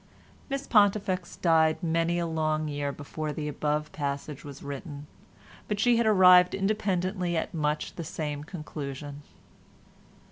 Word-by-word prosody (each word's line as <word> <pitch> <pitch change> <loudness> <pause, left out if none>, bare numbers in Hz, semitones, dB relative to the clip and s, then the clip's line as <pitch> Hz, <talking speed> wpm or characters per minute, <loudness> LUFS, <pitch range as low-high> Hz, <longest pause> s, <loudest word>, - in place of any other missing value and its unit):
Miss 275 0 -3
Pontifex 200 -5 +2
died 160 0 +3
many 165 +1 +1
a 170 - 0
long 155 -1 -1
year 145 -1 -2
before 150 +2 -5
the 150 0 -4
above 150 +1 -2
passage 140 0 -4
was 140 -1 -10
written, 145 +1 -7 0.6
but 210 -1 -2
she 240 +1 +4
had 235 -1 +2
arrived 180 -3 +7
independently 190 -3 0
at - - -3
much 150 -2 -1
the 170 - -4
same 150 -2 -4
conclusion. 145 -3 -7
160 Hz, 135 wpm, -28 LUFS, 150-185 Hz, 0.6 s, arrived